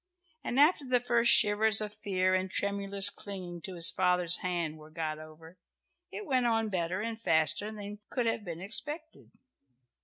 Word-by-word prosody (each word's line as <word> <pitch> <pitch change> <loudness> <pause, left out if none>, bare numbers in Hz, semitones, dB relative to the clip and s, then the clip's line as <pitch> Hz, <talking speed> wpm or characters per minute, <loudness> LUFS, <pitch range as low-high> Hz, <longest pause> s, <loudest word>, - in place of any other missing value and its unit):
And 250 - -2
after 300 +1 +4
the 255 -2 +1
first 235 -1 +3
shivers 215 0 +4
of 210 -1 -5
fear 185 -3 -1
and 185 0 -1
tremulous 200 0 +2
clinging 180 -4 -8
to 190 +1 -7
his 165 -1 +2
father's 180 -2 +4
hand 170 -4 -3
were 155 0 -14
got 155 -1 -5
over, 160 +2 -14 0.5
it 425 - -7
went 255 -5 +1
on 225 -1 0
better 180 0 -2
and 225 0 -5
faster 160 +4 +1
than 205 -1 -8
could 245 -2 -2
have 225 -1 -1
been 170 -3 -7
expected. 295 - -4
200 Hz, 165 wpm, -30 LUFS, 175-225 Hz, 0.5 s, after